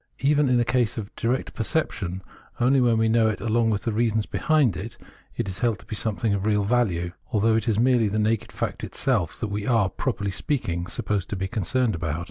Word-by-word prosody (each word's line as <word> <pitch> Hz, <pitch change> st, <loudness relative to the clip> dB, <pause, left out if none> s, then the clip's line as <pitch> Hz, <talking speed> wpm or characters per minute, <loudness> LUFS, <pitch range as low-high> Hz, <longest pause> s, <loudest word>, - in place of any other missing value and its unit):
Even 145 Hz, 0 st, +3 dB
in 125 Hz, -1 st, +3 dB
a 120 Hz, -, +2 dB
case 120 Hz, -3 st, +1 dB
of 105 Hz, -2 st, -6 dB
direct 125 Hz, +3 st, -1 dB
perception, 100 Hz, -, -2 dB, 0.4 s
only 130 Hz, +2 st, +4 dB
when 120 Hz, -2 st, +3 dB
we 110 Hz, 0 st, +3 dB
know 110 Hz, 0 st, +3 dB
it 105 Hz, -3 st, -1 dB
along 115 Hz, 0 st, +1 dB
with 105 Hz, -2 st, -1 dB
the 115 Hz, -, -1 dB
reasons 110 Hz, -1 st, +1 dB
behind 150 Hz, -, +2 dB
it, 105 Hz, +5 st, -7 dB, 0.4 s
is 120 Hz, -, -1 dB
it 95 Hz, 0 st, -5 dB
held 115 Hz, -4 st, +2 dB
to 100 Hz, -, -17 dB
be 110 Hz, -, -5 dB
something 110 Hz, 0 st, -1 dB
of 100 Hz, +1 st, -1 dB
real 105 Hz, -1 st, +2 dB
value; 100 Hz, -6 st, +1 dB, 0.2 s
although 110 Hz, 0 st, +3 dB
it 110 Hz, 0 st, 0 dB
is 110 Hz, -3 st, +2 dB
merely 120 Hz, -1 st, +3 dB
the 105 Hz, +1 st, -1 dB
naked 110 Hz, 0 st, 0 dB
fact -, -, -4 dB
itself -, -, -1 dB
that 110 Hz, -, -2 dB
we 100 Hz, 0 st, -3 dB
are, 115 Hz, -6 st, +3 dB
properly 100 Hz, 0 st, -2 dB
speaking, 90 Hz, -, -2 dB
supposed 100 Hz, -2 st, -2 dB
to -, -, -2 dB
be 95 Hz, 0 st, -2 dB
concerned 110 Hz, +4 st, 0 dB
about. 80 Hz, -1 st, -2 dB
110 Hz, 220 wpm, -25 LUFS, 100-120 Hz, 0.4 s, only